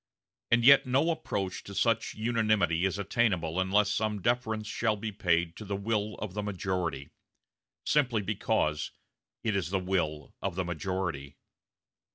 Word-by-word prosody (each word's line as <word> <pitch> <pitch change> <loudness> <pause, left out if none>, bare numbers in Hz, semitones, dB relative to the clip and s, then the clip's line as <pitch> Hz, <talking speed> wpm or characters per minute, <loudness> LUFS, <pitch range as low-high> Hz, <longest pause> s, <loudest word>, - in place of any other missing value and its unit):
And 120 0 +4
yet 140 0 +8
no 140 +7 +3
approach 100 - -3
to 100 - -9
such 115 +2 +1
unanimity 110 -6 +1
is 95 0 0
attainable 95 -5 0
unless 100 +2 +3
some 105 -1 0
deference 110 0 0
shall 110 0 0
be 105 +1 -4
paid 85 -4 +1
to - - -7
the 100 -1 -3
will 105 +1 -1
of 105 -4 -6
the 105 - -2
majority, 90 -8 -3 0.7
simply 125 -8 +2
because 95 -6 0 0.5
it 110 -3 0
is 90 -4 -1
the 95 - +1
will 90 -5 -2
of 95 -2 -2
the 95 0 -1
majority. 85 -5 -3
100 Hz, 150 wpm, -29 LUFS, 90-110 Hz, 0.7 s, yet